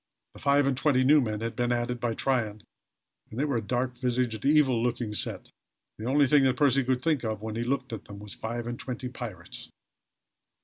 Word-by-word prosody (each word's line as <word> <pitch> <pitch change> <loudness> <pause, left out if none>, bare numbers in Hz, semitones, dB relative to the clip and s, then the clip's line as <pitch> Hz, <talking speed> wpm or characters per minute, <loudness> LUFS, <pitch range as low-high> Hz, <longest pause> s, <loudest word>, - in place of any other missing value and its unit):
The - - -13
five 140 0 +3
and 135 -1 +1
twenty 130 -1 +2
new 145 +3 +6
men 110 -3 -2
had 115 0 -3
been 120 -1 0
added 120 0 -1
by 115 -2 -1
Tryon, 110 -6 -1 0.7
and 110 - -7
they 145 - +2
were 140 -5 0
a - - -1
dark 125 +2 -2
visaged, 120 -3 -1
evil 140 -3 +4
eyed - - -1
looking 120 -3 -1
set. - - -3 0.5
The 110 - -5
only 140 +2 +4
thing 145 +2 +5
that 130 - +2
Percy 140 -2 +4
could 130 0 0
think 155 -6 +1
of 110 -2 -3
when 110 -1 -4
he 115 - -1
looked 130 0 -2
at 110 - -6
them, 100 - -10
was 105 0 -9
five 120 +1 -4
and 120 0 -5
twenty 125 0 -5
pirates! 120 -5 -8
125 Hz, 220 wpm, -28 LUFS, 115-135 Hz, 0.7 s, new